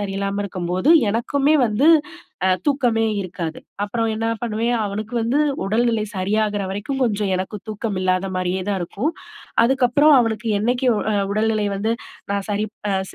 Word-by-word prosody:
சரியில்லாம 200 0 -2
இருக்கும்போது, 185 - -1 0.2
எனக்குமே 275 +7 +1
வந்து 215 +8 +2 0.6
அ - - +4 0.2
தூக்கமே 250 -6 +2 0.2
இருக்காது. 170 -4 -5 0.2
அப்பறம் 225 +2 -1
என்னா 225 +1 -1
பண்ணுவேன், 235 +1 0
அவனுக்கு 210 +3 -4
வந்து 235 +5 +1 0.3
உடல்நிலை 225 +2 +1
சரியாகிற 205 +2 0
வரைக்கும், 205 +8 -3
கொஞ்சம் 210 -4 0
எனக்கு 190 +3 -4
தூக்கம் 215 -1 -3
இல்லாத 185 0 +1
மாரியே 185 +1 -1
தான் 200 - 0
இருக்கும். 245 - -2 0.5
அதுக்கப்புறம், 265 +4 +4
அவனுக்கு 225 -1 0
என்னைக்கு 245 +5 0
ஒ - - 0 0.3
உடல்நிலை 215 0 +1
வந்து 220 +3 0 0.4
நா - - +1
சரிப் 210 +1 -2 0.2
அ - - +1 0.2
ச - - -14
215 Hz, 145 wpm, -21 LUFS, 195-235 Hz, 0.6 s, அ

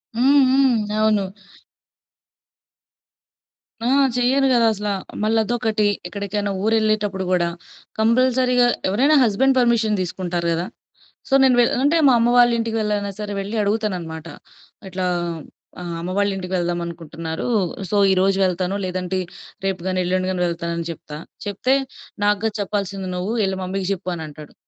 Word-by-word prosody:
హ్మ్. 275 +4 +5
హ్మ్. 265 -2 +4 0.2
అవును. 215 -3 +2 2.6
ఆ! - - +1 0.3
చెయ్యరు 265 +3 +3
గదా! 235 -2 +4
అసల. 210 0 -4 0.3
మళ్ళదొకటి, 220 0 +1 0.2
ఎక్కడికైనా 200 +1 -3
ఊరెళ్ళేటప్పుడు 215 -3 +1
గూడా 175 -2 +2 0.5
కంపల్సరీగా 250 +2 +3 0.2
ఎవరైనా 265 +10 +3
హస్బెండ్ 255 +4 +2
పర్మిషన్ 230 -3 +2
తీసుకుంటారు 175 -1 -3
గదా! 170 +2 -2 0.6
సో, - - -2
నేను 260 -2 +5
వె 240 - +6 0.2
అంటే 300 +4 +3
మా - - +5
అమ్మ 230 +1 +3
వాళ్ళింటికి 235 -2 +3
వెళ్లైనా 210 -1 -1
సరే 210 -1 -4
వెళ్లి 200 +3 -5
అడుగుతానన్నమాట. 185 -7 -2 0.6
ఇట్లా 185 0 -3 0.8
ఆహ్, 175 -1 -5
అమ్మ 175 +2 -4
వాళ్ళింటికి 195 -2 -1
వెళ్దామనుకుంటున్నారు. 170 -2 -4 0.4
సో, - - -1 0.2
ఈరోజు 190 +1 +2
వెళ్తాను 185 +1 -1
లేదంటే 185 0 -2 0.5
రేపు 190 -2 -1
గాని, 185 0 0
ఎల్లుండి 185 +1 0
గాని 180 -1 -1
వెళ్తానని 170 0 -3
చెప్తా. 150 -2 -9 0.3
చెప్తే 205 +6 +1 0.5
"నాగ్గాదు 210 +1 +1
చెప్పాల్సింది. 195 -1 -3
నువ్వు 185 +5 -2
యెళ్ళి 190 -1 -1
మమ్మీ‌కి 185 0 -3
జెప్పు." 185 -1 -5
అని 160 - -6
అంటాడు. 150 0 -12
200 Hz, 125 wpm, -21 LUFS, 180-225 Hz, 2.6 s, వె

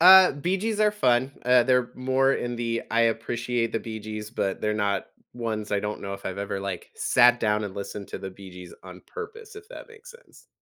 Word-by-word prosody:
Uh, 185 +1 +9
Bee 175 +7 -1
Gees 220 +2 -2
are 210 - +5
fun, 130 -9 +2
uh, 125 0 +6
they're 125 -1 +2
more 130 +1 +2
in 120 -2 -2
the 115 -1 -2
"I 115 0 +3
appreciate 115 +1 0
the 115 - -1
Bee 110 -1 -6
Gees," 110 0 -6
but 95 -5 -2
they're 105 0 0
not 100 -2 0 0.3
ones 110 -3 -4
I 100 - +2
don't 105 0 -4
know 100 - -4
if 100 - -9
I've 95 0 -4
ever, 100 -1 -3
like, 95 -3 -5
sat 120 0 +4
down 105 -1 +1
and 100 -2 -6
listened 100 0 -6
to - - -6
the 95 - -6
Bee 95 0 -12
Gees 90 -1 -11
on 90 -1 -11
purpose, 445 -1 -9
if 425 0 -12
that - - -10
makes 460 +2 -14
sense. 475 +1 -19
115 Hz, 225 wpm, -26 LUFS, 105-135 Hz, 0.3 s, Uh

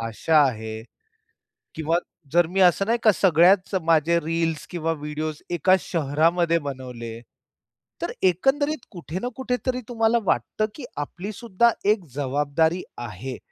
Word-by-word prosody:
भाषा 115 +8 0
आहे 110 -3 -5 0.9
किंवा 160 +1 +1 0.4
जर 175 -1 +4
मी 190 +3 0
असं 185 +2 +4
नाही 230 +2 +2
का 215 - +7
सगळ्याच 185 +2 +4
माझे 165 +1 +3
रील्स 165 -1 -2
किंवा 165 -2 -2
व्हिडिओज 150 0 -5
एका 175 +2 +3
शहरामध्ये 165 +2 +1
बनवले. 120 -4 -7 0.8
तर - - -2
एकंदरीत 270 - +1
कुठे 175 -2 -6
ना 245 - -2
कुठे 255 -1 -1
तरी 255 -1 -1
तुम्हाला 225 -1 +2
वाटतं 215 - 0
की 275 - -8
आपलीसुद्धा 200 - 0 0.2
एक 205 -5 -1
जबाबदारी 145 +5 0 0.2
आहे, 120 +2 -6
170 Hz, 130 wpm, -24 LUFS, 145-195 Hz, 0.9 s, का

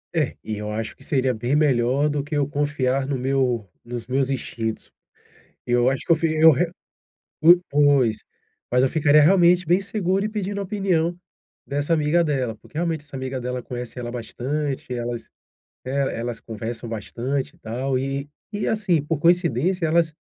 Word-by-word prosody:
É 155 -5 0
e 110 - -4
eu 105 0 -4
acho 110 +1 -4
que - - -18
seria 130 -3 +1
bem 120 +5 -1
melhor 135 -1 +3
do 145 -1 -1
que 150 +2 -5
eu 140 -2 +1
confiar 140 -3 0
no 140 -1 -1
meu 125 -4 0 0.2
nos 120 -1 -6
meus 130 +2 0
instintos. 115 -4 -4 0.7
Eu 120 +1 +3
acho 135 -1 -3
que - - +1
eu - - +7
fiz 160 0 0
eu 160 0 +9
re 165 +4 +1 0.7
o 170 +3 +8
pois, 140 -7 +3 0.5
mas 125 +1 +4
eu 130 - +3
ficaria 150 0 +5
realmente 180 +2 +5
bem 175 +4 +3
seguro 195 -1 0
e 215 - -1
pedindo 205 -2 -3
a - - -2
opinião 180 -4 0 0.5
dessa 145 +3 0
amiga 160 +2 +3
dela, 130 -7 -1
porque 150 - -13
realmente 165 -3 -1
essa 145 -2 -12
amiga 130 0 -4
dela 125 0 -3
conhece 125 0 -6
ela 120 -1 -4
bastante, 130 +3 -3
elas, 120 -1 -4 0.6
eh, 130 - -5 0.3
elas 120 0 -4
conversam 115 +1 -6
bastante 120 +5 -3
e - - -28
tal 130 +4 -2
e 135 +2 -3 0.2
e 205 0 -2
assim, 190 -8 +1
por 150 +1 -2
coincidência, 170 +1 +2
elas 160 0 +2
140 Hz, 175 wpm, -23 LUFS, 125-165 Hz, 0.7 s, eu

